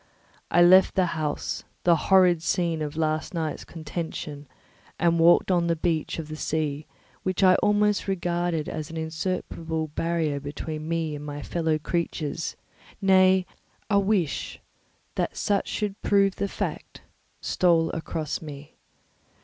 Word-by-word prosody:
I 175 - +5
left 185 +2 +6
the 185 - +3
house, 155 -3 -3 0.2
the 170 -1 +5
horrid 180 -1 +4
scene 165 -1 0
of 150 0 -4
the 160 - -1
last 155 +2 -1
night's 160 -3 -2
contention, 155 -2 -6 0.5
and 170 -1 +2
walked 170 +3 +5
on 175 -2 +2
the 170 - +2
beach 160 -1 -1
of 160 -2 -5
the 155 - -6
sea, 155 -1 -2 0.3
which 185 +1 -1
I 185 -1 +7
almost 210 0 +2
regarded 175 -4 -1
as 155 -2 -5
an 165 - -7
insuperable 160 -1 -3
barrier 160 -2 -1
between 155 +2 -6
me 165 -2 -1
and 145 - -7
my 145 -1 -6
fellow 160 -2 0
creatures; 160 -1 -3 0.4
nay, 190 -1 +5 0.5
a 200 - +5
wish 195 -7 -1 0.5
that - - -2
such 200 -1 0
should 205 -2 -3
prove 200 -1 +3
the 200 - -1
fact - - -5 0.4
stole 165 -2 +2
across 160 -2 -4
me. 145 -2 -10
165 Hz, 140 wpm, -26 LUFS, 155-185 Hz, 0.5 s, I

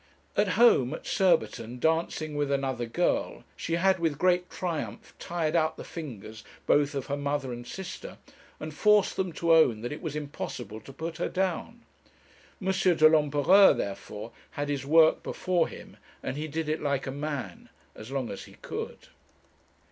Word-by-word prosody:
At - - +3
home, 185 - +5
at - - -11
Surbiton, 125 - +1
dancing 160 +1 0
with 145 -1 0
another 135 -3 -1
girl, 175 +10 0
she 165 - -4
had 190 +2 +3
with 160 -4 0
great 180 +1 +2
triumph 150 - -4
tired 165 -2 -2
out 160 -1 +2
the - - -7
fingers 110 - -8 0.2
both 145 0 +3
of 135 - -2
her 140 - -2
mother 145 -2 -2
and 120 0 -8
sister, 190 -1 -7 0.4
and 155 0 -6
forced 210 +5 +4
them 185 -2 -1
to 165 0 +2
own 130 -9 +5
that 120 - -4
it 150 - -6
was 155 -4 -4
impossible 120 -7 -6
to 135 - -12
put 160 +4 -6
her 175 - -1
down. 190 +5 -2 0.8
M. 190 -1 0
de 180 -4 +5
l'Empereur, 155 +5 +5
therefore, 105 +3 -5 0.2
had 145 0 -4
his 140 -1 -2
work 160 +1 +5
before 180 -3 0
him, - - -12 0.3
and 130 - -3
he 150 +2 -3
did 160 +1 -3
it 155 +1 -1
like 140 -2 -1
a 135 - -3
man 140 - -5 0.2
as 110 +2 -10
long 135 -3 -3
as - - -7
he - - -15
could. - - -7
150 Hz, 170 wpm, -28 LUFS, 135-170 Hz, 0.8 s, home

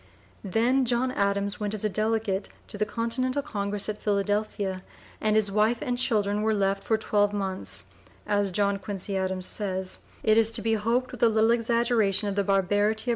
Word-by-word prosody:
Then 235 +7 +2
John 250 +1 +1
Adams 200 -2 -1
went 210 0 -2
as 215 - -6
a - - +3
delegate 215 -1 -1 0.2
to - - -7
the 210 - +1
Continental 255 +5 -1
Congress 205 -2 -3
at 210 -1 -4
Philadelphia, 205 -2 -1 0.4
and 215 0 +2
his 210 -2 +2
wife 215 +4 +2
and 245 - -2
children 210 -4 +1
were 220 0 +1
left 195 -1 0
for 220 - +1
twelve 205 -1 +1
months, 190 -2 -2 0.3
as 205 -1 +1
John 200 +1 0
Quincy 195 0 -4
Adams 190 -1 -2
says, 190 -2 -2 0.2
it 215 +1 +5
is 225 -1 +3
to 225 -2 +4
be 225 0 +2
hoped 230 +4 0
with 250 - -9
a 235 - +6
little 220 +1 +3
exaggeration 230 -3 +2
of 200 - -1
the 200 - +1
barbarity 205 +2 +2
of - - -10
(p. - - -2
210 Hz, 190 wpm, -26 LUFS, 200-225 Hz, 0.4 s, a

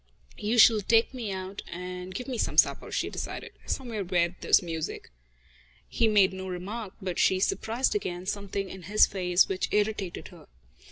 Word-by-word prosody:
"You 215 +3 0
shall 220 -1 +7
take 225 +5 +3
me 235 -5 -4
out 190 +1 -5
and 180 +1 -7
give 250 - -5
me 250 -4 -3
some - - -1
supper," - - +3
she - - -1
decided, - - -6 0.2
"somewhere 235 -6 -3
where 175 -1 0
there's - - +4
music." 160 - -5 0.8
He 225 - +1
made 205 -3 +4
no 190 0 -6
remark, 190 +3 -6
but 180 -2 -3
she 185 - +3
surprised 225 +6 0
again 180 - -3
something 200 0 -3
in 190 0 -9
his 210 +1 +6
face 180 -1 +2
which 190 -1 -2
irritated 210 -3 -1
her. - - -16
195 Hz, 170 wpm, -28 LUFS, 180-220 Hz, 0.8 s, shall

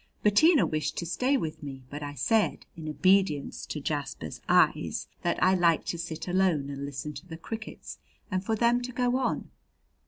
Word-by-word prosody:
Bettina 290 - +5
wished 155 0 -2
to 170 - -2
stay 255 - +1
with 160 -10 -4
me, 135 -3 -7
but 145 +1 -6
I 145 0 -5
said, 215 - +1
in 160 -2 -6
obedience 185 -3 +2
to 150 - -4
Jasper's 140 - -4
eyes, - - +3
that - - 0
I 185 +1 +5
liked 170 -3 +3
to 170 - -2
sit 165 -1 -5
alone 175 -6 +1
and 140 0 -5
listen 145 +2 -5
to 180 - -10
the 160 -2 -7
crickets, 220 +6 -7 0.3
and 185 0 0
for 220 +3 0
them 235 +2 +3
to 250 +1 -5
go 245 +1 +1
on. 260 - -2
170 Hz, 185 wpm, -28 LUFS, 150-215 Hz, 0.3 s, Bettina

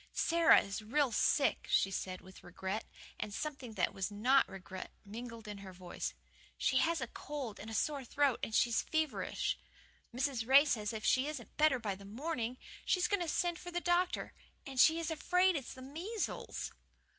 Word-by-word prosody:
"Sara 335 0 +6
is 200 +2 -5
real 265 +5 +1
sick," 275 +5 +2
she 195 - +3
said, 185 -1 -4
with 190 0 -14
regret, 190 +4 -4 0.3
and 210 - -3
something 270 -1 -5
that 185 - +1
was 190 +1 -2
not 245 +7 +3
regret 190 0 -7 0.2
mingled 230 +1 -8
in 205 -1 -6
her 190 -1 -9
voice. 180 -1 -5 0.4
"She 260 - +2
has 330 +2 +2
a 260 - -2
cold 275 -4 -6
and 220 +1 -4
sore 290 -3 0
throat, 280 0 +1
and 220 - -2
she 235 - +4
is 225 - +3
feverish. 315 -2 -1 0.5
Mrs. 250 -2 -1
Ray 275 +3 +8
says 210 -7 0
if 220 -1 -5
she 260 +2 +3
isn't 295 -6 -6
better 305 -3 +4
by 215 -5 -2
the 195 +1 -11
morning 245 +2 -3 0.3
she's 365 -1 +2
going 405 -2 +1
to 345 - -1
send 345 +1 0
for 355 - -7
the 350 0 -1
doctor. 350 +1 +1 0.3
AND 270 -2 -5
SHE 320 +5 +7
IS 330 0 -2
AFRAID 360 +3 +3
IT'S 275 -5 -4
THE 260 - -10
MEASLES." 350 - -4
260 Hz, 185 wpm, -34 LUFS, 215-310 Hz, 0.5 s, Ray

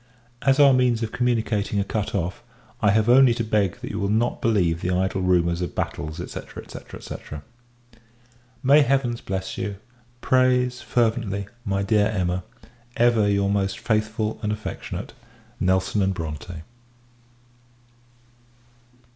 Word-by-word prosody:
As 135 +1 +3
our 140 -2 +7
means 125 -3 +2
of 110 - -3
communicating 110 -4 0
are - - +2
cut 105 +1 -3
off, 90 -1 -2 0.4
I 105 - +4
have 110 +2 +3
only 125 -1 +6
to 115 - -1
beg 105 -4 0
that - - -5
you 105 - -4
will 100 -1 -1
not 115 +3 0
believe 90 -7 +1
the 90 - -1
idle 95 +1 0
rumours 85 -1 +2
of 90 - -4
battles, 80 +1 -3
&c. 85 - -4 0.2
&c. - - -10 0.2
&c. - - -7 1.5
May 140 +3 +6
Heavens 135 -4 +1
bless 95 0 -4
you! 100 +1 -3 0.4
prays, 125 -1 +2
fervently, 110 -4 0 0.2
my 100 -3 -1
dear 105 0 +3
Emma, 90 -4 -1 0.5
ever 115 -3 +4
your 100 0 +1
most 100 -1 0
faithful 110 -1 -1
and 105 - -1
affectionate 105 0 -5 0.5
NELSON 95 +1 +1
& - - -2
BRONTE. 80 -4 -5
105 Hz, 140 wpm, -24 LUFS, 95-120 Hz, 1.5 s, our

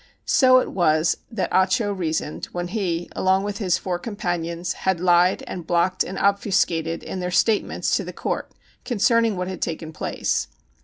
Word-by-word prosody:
So 255 -1 +5
it 255 - +1
was 155 -3 +2
that 200 -6 -3
Ah 190 0 +5
Cho 205 +1 0
reasoned, 160 -5 -2
when 175 0 -5
he, 175 -5 -2
along 190 +1 +2
with 205 -1 -4
his 185 -4 +1
four 180 -2 -3
companions, 175 -4 -3
had 190 -2 -1
lied 180 +1 +3
and 175 -3 -7
blocked 175 +1 +2
and 190 - -6
obfuscated 180 -5 +1
in 190 - -5
their 180 0 -2
statements 210 +4 +1
to - - -3
the - - -6
court - - -3 0.3
concerning 230 -2 +2
what 180 0 -2
had 185 -1 -6
taken 160 -1 -4
place. - - -2
185 Hz, 170 wpm, -23 LUFS, 170-200 Hz, 0.3 s, So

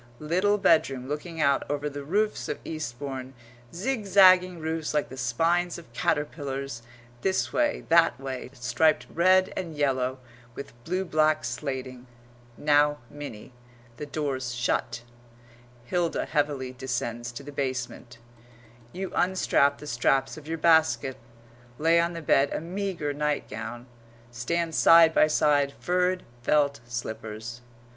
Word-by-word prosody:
little 185 +8 +1
bedroom 135 -9 +2
looking 160 +3 -5
out 140 -2 +3
over 145 0 -2
the 145 -1 -6
roofs 210 +8 -1
of - - -2
Eastbourne 135 -2 -6 0.4
zigzagging 185 -4 +4
roofs 160 -1 -3
like 150 - 0
the 130 - -9
spines 165 +8 0
of 160 -9 -14
caterpillars, 140 -3 -2 0.4
this 190 -1 0
way, 300 -1 0
that 165 -6 +4
way, 130 -2 -6
striped 130 +4 +1
red 185 +2 +4
and 170 -4 -5
yellow, 130 -3 0 0.4
with 140 - -8
blue 185 +2 -1
black 155 -2 +2
slating]. 130 0 -5 0.5
Now, 145 0 +3
Minnie, 135 -6 -9 0.4
the 150 - -6
door's 135 -5 -3
shut; 120 -1 -1 0.8
Hilda 170 +5 -1
heavily 145 -4 -1
descends 120 -2 -4
to 140 - -8
the 145 - -9
basement; 130 -3 -4 0.8
you 190 0 -5
unstrap 175 -6 +2
the - - -11
straps 135 0 +1
of 155 -1 -12
your 165 +1 -3
basket, 160 -4 +3 0.6
lay 165 +2 +4
on 170 +1 +1
the 165 -1 -7
bed 140 -1 +3
a - - -2
meagre 175 -3 -3
nightgown, 145 -4 -3 0.5
stand 165 +8 -2
side 165 0 +7
by 155 - +5
side 145 -2 +2
furred 180 +1 0 0.2
felt 140 +2 +2
slippers. 115 0 -6
145 Hz, 130 wpm, -27 LUFS, 130-170 Hz, 0.8 s, side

